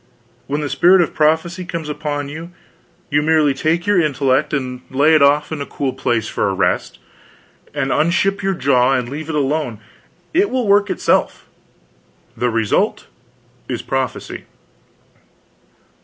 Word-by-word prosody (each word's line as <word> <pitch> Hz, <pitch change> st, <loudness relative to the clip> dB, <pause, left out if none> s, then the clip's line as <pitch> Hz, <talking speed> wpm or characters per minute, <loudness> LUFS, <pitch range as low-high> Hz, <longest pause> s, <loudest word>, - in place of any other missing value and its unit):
When 145 Hz, +2 st, -2 dB
the 145 Hz, -, -2 dB
spirit 180 Hz, +6 st, +5 dB
of 165 Hz, -, -1 dB
prophecy 160 Hz, +4 st, +1 dB
comes 170 Hz, -3 st, -5 dB
upon 145 Hz, -1 st, -3 dB
you, 160 Hz, +4 st, -8 dB, 0.6 s
you 145 Hz, +1 st, +3 dB
merely 155 Hz, -2 st, +3 dB
take 160 Hz, +6 st, 0 dB
your 205 Hz, -3 st, +3 dB
intellect 140 Hz, -2 st, +1 dB
and 130 Hz, -3 st, -3 dB
lay 145 Hz, +4 st, +3 dB
it 155 Hz, -, +5 dB
off 145 Hz, +2 st, +3 dB
in 155 Hz, -2 st, -4 dB
a -, -, -3 dB
cool 135 Hz, -2 st, -3 dB
place 115 Hz, -3 st, -1 dB
for -, -, -1 dB
a -, -, -2 dB
rest, -, -, -1 dB, 0.7 s
and 135 Hz, -2 st, -2 dB
unship 170 Hz, +5 st, +1 dB
your 195 Hz, -1 st, 0 dB
jaw 135 Hz, -4 st, +2 dB
and 125 Hz, -2 st, 0 dB
leave 150 Hz, +5 st, -6 dB
it 160 Hz, -, -2 dB
alone; 140 Hz, -5 st, -1 dB, 0.5 s
it 385 Hz, +5 st, +3 dB
will 255 Hz, -2 st, -1 dB
work 205 Hz, +1 st, +4 dB
itself: -, -, 0 dB, 0.9 s
the 125 Hz, -, 0 dB
result 115 Hz, -2 st, 0 dB, 0.6 s
is -, -, -3 dB
prophecy. -, -, -4 dB
150 Hz, 150 wpm, -18 LUFS, 135-170 Hz, 0.9 s, spirit